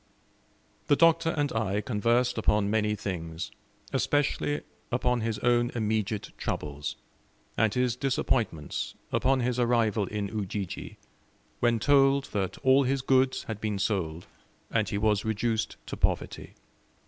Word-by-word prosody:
The 145 - +5
Doctor 165 +1 +4
and 145 -1 0
I 105 -2 0
conversed 120 +3 +1
upon 105 -1 +2
many 105 -1 +1
things, 85 -2 -5 0.4
especially 145 +1 +1 0.3
upon 125 0 +1
his 110 -1 -1
own 120 0 +3
immediate 110 -2 -1
troubles, 75 0 -3 0.6
and 110 -1 +3
his 125 0 0
disappointments, 120 - -1 0.2
upon 130 0 +2
his 125 0 0
arrival 115 -4 +2
in 105 0 -3
Ujiji, 100 -3 -4 0.6
when 120 -1 +3
told 135 +3 +4
that 95 -3 -2
all 130 +1 +6
his 135 0 0
goods 130 0 +2
had 110 -2 -6
been 105 -2 -1
sold, 90 -5 -1 0.5
and 110 -4 +1
he 100 - -1
was 105 -1 +2
reduced 110 +1 -1
to - - -5
poverty. - - -2
110 Hz, 130 wpm, -28 LUFS, 105-125 Hz, 0.6 s, all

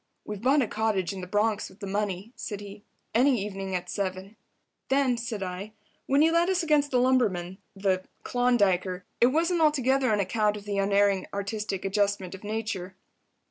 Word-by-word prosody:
"We've 210 -2 -6
bought 270 +3 +4
a - - -2
cottage 210 -4 0
in 190 - -6
the 180 - -7
Bronx 210 +2 0
with 190 - -19
the 205 - -6
money," 200 +2 -3
said 205 -2 -5
he. 205 0 -10 0.3
"Any 250 +2 +4
evening 195 -2 -4
at 180 0 -3
7." 190 +1 -4 0.5
"Then," 270 -2 +3
said 230 -4 -4
I, 190 +3 -6 0.3
"when 280 +2 +4
you 325 - +4
led 340 +2 +3
us 370 -2 +1
against 300 -2 +3
the 255 - +1
lumberman—the—Klondiker—it 195 -2 +1
wasn't 330 +5 +1
altogether 270 -4 +3
on 210 - +2
account 210 +2 +1
of 205 - -11
the 200 -1 -1
Unerring 200 -1 +2
Artistic 200 -1 -3
Adjustment 200 -2 0
of 190 - -10
Nature?" 205 -4 -4
205 Hz, 165 wpm, -27 LUFS, 195-245 Hz, 0.5 s, bought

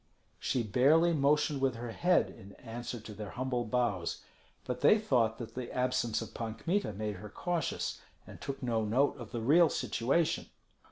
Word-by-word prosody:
She 125 - 0
barely 150 +10 +4
motioned 150 -1 +2
with 135 -2 +2
her 120 0 -5
head 175 +9 +2
in 100 +1 -13
answer 120 +1 -6
to 110 0 -9
their 105 -1 -7
humble 125 +1 -2
bows; 110 -7 -1 0.4
but - - -4
they 215 - +7
thought 120 - +1
that 120 - -7
the 125 -1 -5
absence 125 -3 0
of - - -11
Pan 110 -1 -4
Kmita 185 - -1
made 105 0 -3
her 105 +3 -9
cautious, 175 - -2 0.2
and - - -12
took 135 -1 -5
no 115 -3 +1
note 125 +7 +2
of 120 -3 -8
the 120 - -3
real 155 +8 +5
situation. 140 +8 0
125 Hz, 175 wpm, -32 LUFS, 110-145 Hz, 0.4 s, they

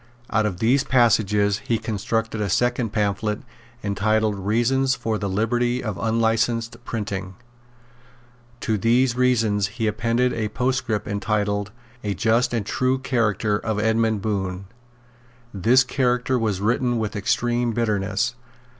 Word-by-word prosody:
Out 110 -1 +2
of 90 -4 -4
these 125 +7 +3
passages 105 -5 +3
he 115 - -1
constructed 110 +1 -2
a 100 - -1
second 120 +3 +1
pamphlet 105 0 -1 0.4
entitled 110 +2 +1
Reasons 120 +6 +1
for 115 -3 -2
the 100 - -2
Liberty 120 +5 0
of 110 -4 -4
Unlicensed 115 +1 +1
Printing. 100 -5 -4 1.3
To 110 -2 0
these 120 +3 +3
Reasons 115 -5 +2
he 115 - 0
appended 115 +3 +1
a 110 -2 -2
postscript 125 -2 -1
entitled 105 0 -1 0.3
A 100 -2 -2
Just 110 +5 +2
and 115 -4 -1
True 130 +4 +1
Character 110 -5 0
of 110 -2 -2
Edmund 110 -1 +1
Bohun. 95 -3 -2 0.9
This 120 +7 +4
character 125 -1 0
was 105 -4 -1
written 120 +3 +1
with 110 -1 -3
extreme 120 +4 0
bitterness. 105 0 0
110 Hz, 130 wpm, -23 LUFS, 105-120 Hz, 1.3 s, This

